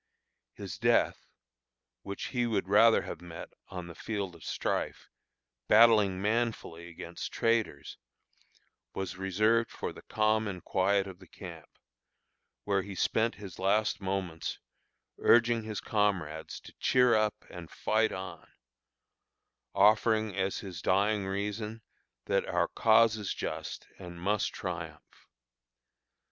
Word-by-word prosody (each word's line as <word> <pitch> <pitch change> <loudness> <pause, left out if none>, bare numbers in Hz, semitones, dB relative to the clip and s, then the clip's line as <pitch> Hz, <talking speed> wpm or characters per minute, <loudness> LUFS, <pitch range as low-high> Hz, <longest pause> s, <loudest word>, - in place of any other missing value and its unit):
His - - -7
death, - - +2 0.7
which 100 0 -5
he 120 -2 0
would 105 -5 -1
rather 110 +3 +6
have - - -7
met 85 -1 -9 0.2
on 90 -2 -6
the 85 - -9
field 100 -1 -4
of 85 - -14
strife, - - -3 0.6
battling 105 -4 +6
manfully 105 -6 -1
against 85 0 -7
traitors, 115 -11 -1 1.0
was 95 -1 -4
reserved 110 +5 +2
for - - -5
the - - -12
calm 110 0 +1
and 90 -3 -6
quiet 95 +1 +2
of 95 -2 -10
the 95 - -15
camp, 85 -5 -10 1.0
where 100 -1 +1
he 100 0 -8
spent 115 +5 +1
his 100 -4 -10
last 105 +3 +1
moments 95 -4 -3 0.6
urging 115 0 +4
his 110 -2 -4
comrades 90 -7 -1
to - - -14
"cheer 125 -2 +4
up 110 -1 +1
and 85 -3 -9
fight 110 +1 +1
on," 95 -3 -8 1.2
offering 110 +1 +4
as 95 0 -1
his 90 -5 -7
dying 100 +2 +2
reason, 105 +3 -3 0.4
that - - 0
"our - - +1
cause 115 0 +4
is 105 -3 -3
just, - - -5
and 85 -1 -9
must 100 +3 0
triumph." 80 -5 -7
100 Hz, 125 wpm, -30 LUFS, 90-110 Hz, 1.2 s, rather